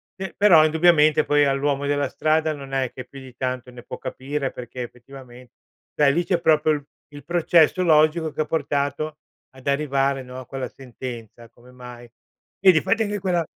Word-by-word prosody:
pe 190 -1 -6
però, 175 -7 +6
indubbiamente, 155 -1 +4
poi, 145 0 +3
all'uomo 140 0 0
della 145 -1 0
strada, 155 0 0
non 140 -2 -10
è 130 -2 -1
che 130 - -8
più 135 +1 -12
di 130 -1 -13
tanto 130 -1 -4
ne 120 -1 -12
può - - -8
capire, 135 +1 -4
perché 125 +1 -8
effettivamen 125 0 -13 0.5
cioè, 145 -2 +4
lì 170 +4 0
c'è 180 -2 0
proprio 155 -1 +3
l 145 -1 -4 0.3
il 145 -2 -11
processo 170 +1 +3
logico, 155 0 +3
che 155 - -3
ha - - -1
portato 150 0 -2 0.4
ad 130 +1 -13
arrivare, 140 -1 0
no, 125 0 -9
a 130 - -10
quella 135 0 -6
sentenza, 120 -3 -10
come 120 +2 -20
mai 125 -1 -12 0.5
Vedi 180 -5 +5
fate 220 +4 +1
anche 205 -1 -3
quella 180 -3 0
145 Hz, 180 wpm, -22 LUFS, 130-155 Hz, 0.5 s, però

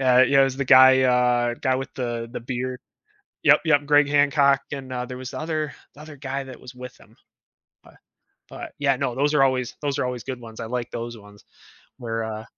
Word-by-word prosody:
Uh, 130 -1 +5
yeah, 140 0 +4
it - - +6
was 135 -1 -3
the 140 - -2
guy, 130 +1 +7
uh, 125 -1 +2
guy 130 +2 -1
with 135 0 -6
the 120 -2 -4
the - - -6
beard. 125 +1 -5 0.6
Yup, - - +5
yup, 145 -3 +2
Greg 145 0 +4
Hancock, 145 -1 +3
and, 135 -2 -7
uh, 125 -1 -3
there 125 0 -8
was 130 -1 -8
the - - -6
other 155 -2 -3 0.2
the 150 - -13
other 155 -2 -12
guy 135 0 -4
that 130 -1 -11
was 125 - -12
with 125 0 -10
him. - - -21 0.7
But - - -19 0.5
but, - - -9
yeah, 140 -2 +2
no, 130 -2 -2
those 145 +2 +1
are 135 - +5
always 130 -2 0
those 140 -1 -2
are - - 0
always 125 -2 -4
good 130 -2 -6
ones, 110 -1 -12
I 115 - -5
like 120 0 -4
those 120 0 -6
ones 105 0 -17 0.6
where, 115 -2 -4
uh 110 0 -6
130 Hz, 225 wpm, -23 LUFS, 120-140 Hz, 0.7 s, guy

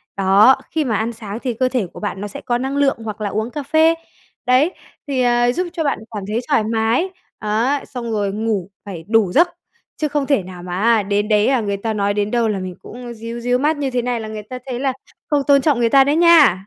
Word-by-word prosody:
Đó, 200 +6 +5 0.2
khi 315 -3 0
mà 225 - 0
ăn 225 +3 -1
sáng 215 -1 -7
thì 250 -3 -2
cơ 255 +3 0
thể 245 -8 -1
của - - -9
bạn 205 -2 -4
nó 205 - -3
sẽ 205 - -9
có 240 - 0
năng 265 +3 -3
lượng, 280 -3 +2
hoặc 215 -1 -6
là 205 - -1
uống 215 +4 -2
cà 295 +1 -5
phê, 315 +3 +4 0.5
đấy, 265 +8 +3 0.3
thì, 270 -3 0
à, 240 0 +3
giúp 360 +7 -2
cho 325 -3 -2
bạn 280 - 0
cảm 205 -3 -5
thấy 215 +3 -1
thoải 280 -6 +3
mái, 225 - +1 0.3
á, 230 +7 0
xong 235 -3 -6
rồi 205 -2 0
ngủ 210 -4 -2 0.2
phải 180 -5 -7
đủ 220 -4 +3
giấc, 340 - +5 0.5
chứ 305 - 0
không 290 -1 -1
thể 275 -8 +1
nào 180 -1 -10
mà 180 0 -4
á, 225 -1 +4
đến 205 +1 0
đấy, 210 0 +3
à, 260 -3 +2
người 200 -1 -2
ta 220 +2 -3
nói 205 -1 0
đến 205 0 -1
đâu 235 -2 +2
là 205 -3 -1
mình 185 -1 -6
cũng 240 0 -9
ríu 230 +1 -7
ríu 245 +1 +1
mắt 300 +2 +1
như 280 -2 -1
thế 245 -1 0
này 245 0 -2
là 220 - -6
người 215 -1 -6
ta 250 +4 -8
thấy 250 -2 -4
là 270 0 0 0.4
không 290 -2 +2
tôn 280 -1 +5
trọng 285 -5 +2
người 235 -1 +2
ta 270 +3 +6
đấy 285 +2 +1
nha. 315 - +5
235 Hz, 260 wpm, -19 LUFS, 210-270 Hz, 0.5 s, ta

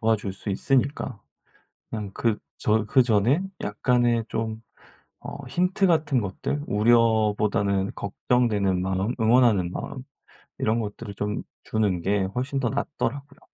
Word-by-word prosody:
도와줄 110 -3 +1
수 100 - -5
있으니까 130 +1 0 0.7
그냥 105 -3 -4
그 115 -3 0 0.2
저 110 0 +1
그전에 120 - +3 0.2
약간의 120 +2 +1
좀 110 0 -3 0.6
어 - - -6
힌트 180 +7 +1
같은 155 -6 +2
것들 110 +8 -3
우려보다는 105 -3 +2
걱정되는 100 -3 +1
마음, 95 +5 -1
응원하는 110 -6 +4
마음 130 +6 -6 0.5
이런 110 +2 +1
것들을 105 -1 -5
좀 105 +1 -3 0.2
주는 100 -6 0
게 100 +1 +1
훨씬 135 +2 -2
더 125 -3 0
낫더라고요. 140 0 -3
110 Hz, 265 characters per minute, -25 LUFS, 100-125 Hz, 0.7 s, 응원하는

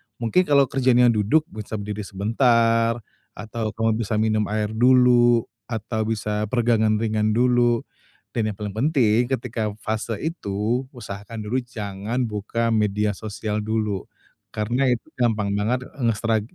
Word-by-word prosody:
mungkin 120 +12 +1
kalau 140 -1 +5
kerjanya 125 -2 +4
duduk 110 +9 +2
bisa 110 0 -6
berdiri 105 0 -5
sebentar, 115 +2 +2 0.4
atau 110 -1 -5
kamu 115 0 +1
bisa 110 -1 -1
minum 110 -1 +1
air 105 0 -1
dulu, 120 0 +5 0.2
atau 110 -1 -3
bisa 105 -1 -2
peregangan 115 -2 +2
ringan 110 -1 0
dulu 120 -1 +3 0.5
dan 110 -2 -1
yang - - -14
paling 105 -1 -5
penting 120 -1 +2
ketika 120 -4 -2 0.2
fase 110 +1 -2
itu, 120 - -2
usahakan 105 -1 -7
dulu 120 +5 -1
jangan 110 0 -4
buka 115 +1 -2
media 105 -1 +1
sosial 105 +1 -4
dulu. 105 -2 -2 0.4
Karena, 120 +5 0
itu 120 -2 -1
gampang 110 -5 0
banget, 115 +5 0
eee, 140 - -12
ngestrak 110 0 +1
110 Hz, 140 wpm, -23 LUFS, 105-120 Hz, 0.5 s, kalau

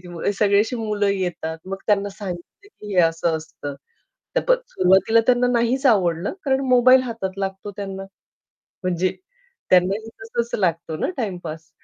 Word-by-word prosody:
जेव्हा 175 +2 -3
सगळे 200 -1 +4
असं 235 +2 -2
मुलं 210 -2 0
येतात 175 -4 -2
मग 195 0 -4
त्यांना 205 -1 +2
सांगितलं 195 - -8
की 210 - -9
हे 180 - +6
असं 165 0 +1
असतं. 155 -3 -7 0.6
तर - - +4
सुरुवातीला 210 - +4
त्यांना 250 0 +4
नाहीच 240 +4 +1
आवडलं 180 -6 +2
कारण 265 -1 +2
मोबाईल 255 +1 +6
हातात 225 -6 -4
लागतो 195 +1 -4
त्यांना, 195 -1 -5 0.8
म्हणजे 185 0 0 0.6
त्यांनाही 190 +5 +3
तसच 235 +1 -3
लागतो 165 -3 0
ना - - -1
टाईमपास 170 - -5
195 Hz, 140 wpm, -22 LUFS, 175-230 Hz, 0.8 s, हे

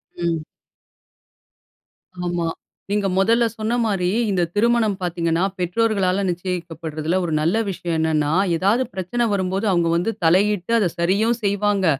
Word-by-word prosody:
ம். 170 -2 -1 1.8
ஆமா. 175 -1 -1 0.4
நீங்க 205 -1 +1
மொதல 230 +4 +3
சொன்ன 220 +2 -1
மாரி, 185 -4 0 0.2
இந்த 185 -2 +1
திருமணம் 220 -2 +2
பார்த்தீங்கன்னா, 170 -1 0 0.2
பெற்றோர்களால 195 0 +1
நிச்சியிக்கப்பட்றதில்ல. 170 -2 -3
ஒரு 160 - -2
நல்ல 165 +6 +1
விஷயம் 175 -3 -3
என்னன்னா 155 -2 +1 0.3
எதாவது 205 +9 +2
பிரச்சனை 190 +6 -2
வரும்போது, 190 +2 -1
அவங்க 170 -2 +2
வந்து 180 +7 0
தலையிட்டு 195 +4 +2
அத 200 - +2
சரியும் 205 +7 +2
செய்வாங்க. 200 -1 +1
185 Hz, 120 wpm, -21 LUFS, 170-210 Hz, 1.8 s, மொதல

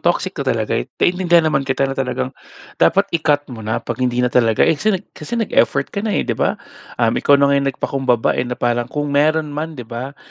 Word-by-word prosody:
toxic - - 0
na - - -2
talaga - - -2
eh. - - -1
Naiintindihan 175 -2 +3
naman 135 0 0
kita 135 +1 +1
na 135 - -1
talagang 130 -1 -3 0.5
dapat 195 +1 +4
i-cut 150 -3 +1
mo 115 - -8
na 110 +1 -2
pag - - -5
hindi 125 -1 +1
na 125 - -1
talaga 115 -3 +3
eh, 165 - +4
kasi 200 +7 +1 0.2
kasi 155 +10 -6
nag-effort 225 - +1
ka 200 - -2
na 210 0 -1
eh, - - 0
'di - - -1
ba? - - 0 0.4
Um, 115 -1 +2
ikaw 140 - +5
na 140 0 +3
nga 140 - +3
nagpakumbaba 130 -3 0
eh, - - -1
na 125 - -3
parang 120 0 0
kung 145 +1 -3
meron 150 +1 +2
man 155 +2 -4
'di 125 - -7
ba, 125 +4 -7
140 Hz, 225 wpm, -19 LUFS, 125-155 Hz, 0.5 s, ikaw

